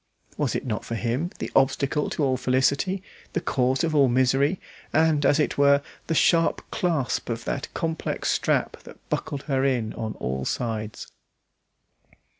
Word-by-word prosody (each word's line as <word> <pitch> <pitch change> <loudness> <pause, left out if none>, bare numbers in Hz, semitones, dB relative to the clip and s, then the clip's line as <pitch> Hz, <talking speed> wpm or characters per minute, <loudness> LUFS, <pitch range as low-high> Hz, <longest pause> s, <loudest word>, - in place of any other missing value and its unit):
Was - - -1
it - - -2
not 110 -4 -2
for 115 - -4
him, 120 +9 -1
the - - -5
obstacle 140 +2 +2
to 150 - -2
all 130 -2 +2
felicity, 135 +9 +1 0.3
the - - +1
cause 130 +1 +1
of 165 -1 0
all 140 -3 +5
misery, 135 +7 +2 0.3
and, 155 -2 +3
as 145 +2 +3
it 150 - 0
were, 140 0 +5 0.2
the 165 - 0
sharp 165 +1 +3
clasp 165 - -1
of 115 -1 -3
that 140 - -3
complex 165 -1 -2
strap - - 0
that - - -13
bucked 140 -1 -2
her 135 -2 0
in 125 -5 0
on 110 -1 -4
all 65 +1 -3
sides. 110 - -3
135 Hz, 160 wpm, -25 LUFS, 125-150 Hz, 0.3 s, all